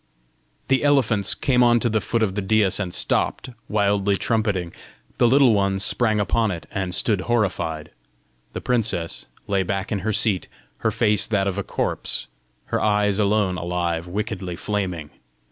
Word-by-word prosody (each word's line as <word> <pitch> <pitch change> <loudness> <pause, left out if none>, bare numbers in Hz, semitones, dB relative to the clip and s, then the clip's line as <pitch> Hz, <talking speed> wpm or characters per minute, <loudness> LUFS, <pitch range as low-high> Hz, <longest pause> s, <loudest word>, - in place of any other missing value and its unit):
The 135 +1 +2
elephants 125 -9 +2
came 125 -2 +2
on 120 -1 +5
to - - +1
the 110 -2 0
foot 115 -1 0
of 100 -3 0
the 105 - -2
daïs, 100 -1 +2
and 95 -3 -3
stopped, 130 - 0 0.2
wildly 100 -1 +2
trumpeting; 100 -6 -1 0.5
the 120 - +5
Little 130 -1 +5
Ones 100 -1 +1
sprang 110 -3 +1
upon 110 +2 +1
it, 85 -4 -5
and 95 -2 -1
stood 105 -5 +1
horrified; 95 -9 -1 0.6
the - - -5
princess 110 -9 -1 0.2
lay 100 -1 +1
back 95 +1 -3
in 105 - 0
her 110 +3 -1
seat, 105 -3 +1 0.3
her - - 0
face 105 -1 +2
that 100 -3 +1
of 100 0 -2
a - - -2
corpse, - - -2 0.5
her - - +1
eyes 105 -1 +2
alone 100 -3 +1
alive, 85 -1 -2
wickedly 95 -2 -4
flaming. 90 -6 -3
100 Hz, 160 wpm, -23 LUFS, 95-110 Hz, 0.6 s, on